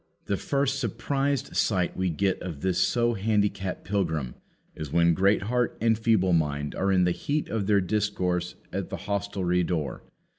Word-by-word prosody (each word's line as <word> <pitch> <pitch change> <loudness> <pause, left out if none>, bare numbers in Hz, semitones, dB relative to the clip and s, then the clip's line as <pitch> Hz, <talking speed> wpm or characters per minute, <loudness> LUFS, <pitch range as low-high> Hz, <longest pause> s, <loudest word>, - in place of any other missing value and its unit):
The 100 - 0
first 140 +5 0
surprised 135 +3 -1
sight 90 -5 +1
we 95 0 0
get 95 +4 0
of 80 -6 -6
this 95 -1 +1
so 120 +5 +2
handicapped 100 -2 0
pilgrim 80 -10 -1 0.4
is 75 -3 -6
when 85 +1 +4
Greatheart 105 +6 +1
and 115 0 +3
Feeble 110 -5 +2
mind 75 -3 0
are 95 +1 0
in 95 -1 +4
the 90 - +3
heat 145 - -2
of 105 -3 -1
their 100 -2 +4
discourse 90 -3 -1 0.2
at - - -3
the - - -4
hostelry 100 -3 0
door. 80 -5 -2
95 Hz, 160 wpm, -27 LUFS, 90-110 Hz, 0.4 s, when